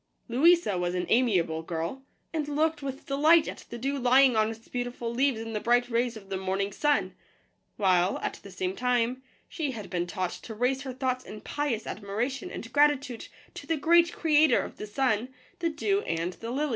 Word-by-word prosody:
Louisa 265 - +4
was 175 0 -1
an 180 - -1
amiable 185 -10 +2
girl, 165 +9 -4 0.3
and 310 -3 -1
looked 305 +1 0
with 275 -1 -6
delight 305 +4 +4
at - - -7
the 235 - -6
dew 275 +4 -2
lying 255 0 +5
on 215 0 +3
its 225 0 -9
beautiful 245 -1 -4
leaves 260 -1 +1
in 225 0 -6
the 210 - -1
bright 245 +2 +2
rays 235 0 0
of 195 -2 -14
the 190 - -1
morning 190 +1 -1
sun; 295 +7 +1 0.6
while, 185 -2 +3
at - - -3
the 200 - -11
same 185 0 -3
time, 250 +1 0 0.3
she 310 -4 -3
had 215 -4 -8
been 175 -1 -1
taught 185 -1 -2
to 220 - -8
raise 250 +4 0
her 265 -2 -5
thoughts 255 -1 -1
in 215 - -9
pious 260 -3 -2
admiration 230 - -3
and 230 - -8
gratitude 285 -4 +2 0.3
to - - -9
the 325 - +1
great 340 +3 +4
Creator 310 -1 +4
of - - -8
the 210 - -6
sun, 240 +1 0 0.3
the 335 -1 +1
dew, 390 +6 0
and 170 - -2
the 230 - -8
lily. 290 +5 -1
245 Hz, 195 wpm, -28 LUFS, 210-285 Hz, 0.6 s, lying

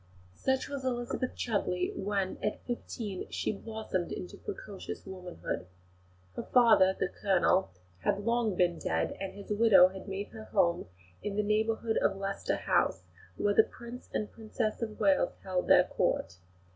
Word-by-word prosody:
Such 265 - 0
was 280 -1 -5
Elizabeth 250 0 -2
Chudleigh 185 -5 -1
when, 195 -1 -1
at 210 - -2
fifteen, 225 -5 -4
she - - -1
blossomed 215 -4 -4
into 180 - -6
precocious 385 - -7
womanhood. 180 - -5 0.7
Her - - -2
father, 215 -6 +5
the - - +2
Colonel, 190 -1 +2 0.3
had 200 - 0
long 230 -3 +2
been 175 -1 +2
dead, 80 0 -1
and 195 - -4
his 200 +1 -9
widow 205 -4 +7
had 190 +2 -9
made 195 +1 -4
her 220 -1 -9
home 175 -5 +2 0.3
in 205 -1 -3
the 210 - +1
neighbourhood 220 +2 +1
of 195 - +2
Leicester 195 0 -1
House, - - +1 0.3
where 205 - +2
the 220 - +8
Prince 235 +2 -9
and 210 - -2
Princess 220 0 -3
of 220 -2 -4
Wales 195 -4 +3
held 185 -1 -1
their - - +7
Court. 90 - -1
205 Hz, 155 wpm, -31 LUFS, 190-225 Hz, 0.7 s, the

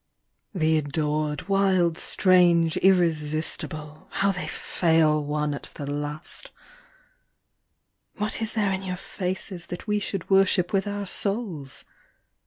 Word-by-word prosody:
THE 160 -2 +2
adored, 150 +1 -2
wild, 190 -4 +2
strange, 175 -3 +4
irresistible, 155 -3 0
How 195 0 +1
they 175 -4 -4
fail 160 -2 +2
one 150 0 -1
at 140 - -2
the 145 - -6
last! 150 - -2 1.7
What 210 +2 -3
is 220 - -1
there 210 -3 +1
in 190 0 -2
your 185 -1 -4
faces 185 -1 -5
That 175 - -7
we 210 -1 0
should 195 -3 -4
worship 190 -1 +3
with 195 +1 +1
our 205 0 -3
souls 195 - 0
175 Hz, 120 wpm, -25 LUFS, 155-195 Hz, 1.7 s, strange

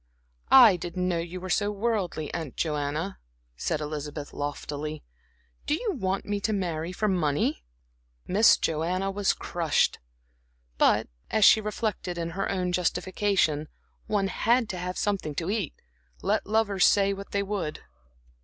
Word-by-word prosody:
"I 235 -8 +8
didn't 180 +1 -3
know 175 -2 0
you 175 +2 -5
were 185 0 -5
so 205 +2 +2
worldly, 200 -8 -2
Aunt 160 -6 -5
Joanna," 150 +4 -2 0.4
said 150 - -2
Elizabeth, 150 -1 -5
loftily. 145 +1 -4 0.6
"Do 295 - +2
you 440 +6 -2
want 195 - -2
me 205 0 -1
to 215 - -1
marry 170 -4 -2
for 215 +4 -1
money?" 150 - 0 0.6
Miss 210 +4 +5
Joanna 180 +5 -1
was 200 0 +1
crushed. 165 -4 0 0.8
But - - +4 0.2
as 215 -2 +4
she 220 - +7
reflected 210 -4 -3
in 170 0 -3
her 190 +4 -2
own 180 -2 -1
justification, 180 -3 +1 0.4
one 200 -2 +1
had 230 +4 +2
to 185 - -4
have 180 +1 -4
something 195 -8 -1
to 170 +5 -2
eat, 205 -8 -2 0.5
let - - 0
lovers 205 -3 +3
say 200 -1 +3
what 195 0 -8
they 200 0 0
would. 195 -6 -3
185 Hz, 145 wpm, -27 LUFS, 160-205 Hz, 0.8 s, I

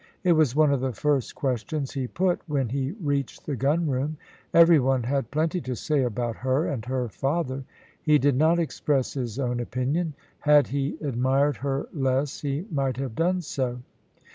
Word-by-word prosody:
It 180 - +4
was 155 -6 +3
one 150 -2 +4
of 135 - 0
the 130 -1 -1
first 140 +2 0
questions 135 +2 -2
he 130 -2 -3
put 180 +5 0
when 140 -5 0
he 135 +4 -2
reached 145 - -3
the 145 - -2
gunroom. 145 +1 0 0.3
Every 170 -1 +7
one 130 -1 +1
had 130 -1 -1
plenty 160 +4 0
to 130 -3 -4
say 150 +3 0
about 120 -1 -2
her 130 +5 +1
and 125 -6 -3
her 130 -1 -1
father. 135 +2 -2 0.4
He 150 -1 +4
did 145 -1 +2
not 160 +5 +4
express 145 -5 0
his 125 -5 -4
own 125 -3 -1
opinion; 135 +7 -1 0.2
had 150 -3 +4
he 140 +3 -2
admired 135 +1 +1
her 135 0 -2
less 135 -1 0
he 145 +4 -2
might 135 -4 0
have 135 -3 -3
done 180 +6 +1
so. 125 -4 -3
140 Hz, 175 wpm, -26 LUFS, 130-150 Hz, 0.4 s, Every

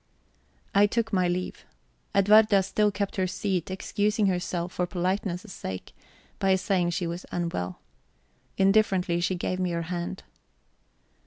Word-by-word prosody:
_ - - -41 0.7
I 200 +1 +6
took 225 +1 -1
my 185 -2 +3
leave. 180 +1 -3 0.5
Edwarda 205 0 +6
still 210 +2 +2
kept 200 -1 -3
her 185 -1 +1
seat, 185 -1 -2
excusing 205 +3 0
herself, 180 -1 -1
for 180 - -1
politeness' 185 +2 -2
sake, 95 -1 -6 0.5
by 190 -1 +3
saying 185 -2 +1
she 175 +1 -1
was 170 +1 -5
unwell. 165 - -3 0.8
Indifferently 195 -3 +3
she 185 +2 0
gave 185 +1 -2
me 185 -1 0
her 170 -1 -2
hand. 170 - -4
185 Hz, 140 wpm, -27 LUFS, 175-200 Hz, 0.8 s, I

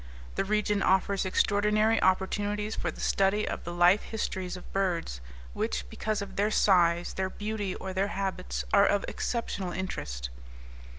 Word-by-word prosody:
The - - 0
region 210 0 +1
offers 190 +1 +2
extraordinary 210 +3 +2
opportunities 205 +3 +1
for - - -2
the - - -9
study 195 +2 +2
of - - -4
the 175 - -4
life 175 +4 +5
histories 190 -4 -4
of 180 - -13
birds 175 - -1 0.3
which, - - -2
because 215 -2 -2
of 200 - -10
their 205 +1 +2
size, 175 -5 +3
their 190 0 -1
beauty, 210 -2 -3
or 190 0 -6
their 190 +2 +1
habits, 185 - -3
are - - +6
of 205 - +1
exceptional 200 -6 -3
interest. 70 - -4
195 Hz, 155 wpm, -29 LUFS, 180-210 Hz, 0.3 s, are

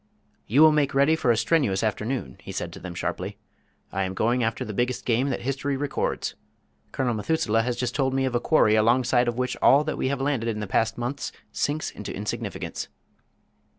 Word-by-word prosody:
"You 130 +8 +4
will 155 - +8
make 145 -3 +1
ready 140 +4 +4
for 160 - 0
a 115 - +4
strenuous 115 - +2
afternoon," 110 - -2
he - - -8
said - - -4
to - - -9
them 90 -1 -7
sharply. - - -3 0.5
"I 95 - -2
am 95 0 -2
going 120 +5 +1
after 115 0 -1
the 105 - -5
biggest 125 +4 -1
game 125 +4 +2
that 130 - -2
history 135 +1 -1
records. 145 0 -2 0.6
Colonel 125 -3 0
Methuselah 115 -1 +1
has 120 +1 -1
just 125 -1 -2
told 135 -2 0
me 135 0 +2
of 130 - -1
a 120 - +2
quarry 120 -5 +4
alongside 120 +3 +3
of 120 0 -1
which 125 0 -1
all 140 +2 +5
that 155 - -3
we - - 0
have 140 +1 -1
landed 135 -4 0
in 105 -2 -2
the 105 - -3
past 115 +3 0
months 125 +4 -3 0.2
sinks 150 +2 -1
into 105 - -7
insignificance." 105 +2 -4
125 Hz, 205 wpm, -25 LUFS, 110-135 Hz, 0.6 s, will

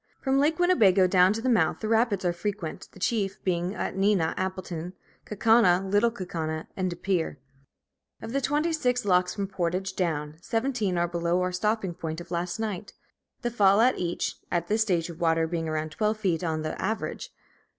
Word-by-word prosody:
From 270 0 +1
Lake 305 +3 +2
Winnebago 210 - +4
down 185 0 +5
to 225 +1 -5
the - - 0
mouth, 235 -3 +2
the 215 - -3
rapids 220 -4 +2
are 175 - +2
frequent, 185 -2 -4
the - - -15
chief 195 -1 0
being 180 +1 -1
at - - -3
Neenah, 195 -4 +2
Appleton, 185 -2 -4 0.3
Kaukauna, 200 -4 +4
Little 205 +4 +3
Kaukauna, 165 -7 -4
and 185 -1 -1
Depere. 175 -3 -1 0.8
Of 225 - -7
the 275 - +1
twenty 300 +5 +1
six 250 -7 0
locks 180 -2 +2
from 200 - -2
Portage 190 0 -2
down, 155 -4 -2
seventeen 225 -4 -1
are 175 0 +2
below 170 +1 0
our 180 - -1
stopping 200 0 -1
point 160 -2 -5
of 175 - -11
last 175 0 -2
night; 210 -3 -4 0.5
the 240 - -1
fall 200 -3 +4
at 250 +3 +3
each, 175 -1 -2
at 175 -1 -1
this 215 +1 +2
stage 180 -6 +1
of 165 - -12
water 165 -1 +3
being 165 -1 -3
about 155 0 -2
twelve 215 +6 0
feet 185 -5 0
on 160 -2 -1
the 155 - -4
average. 225 - -3
190 Hz, 185 wpm, -27 LUFS, 175-220 Hz, 0.8 s, down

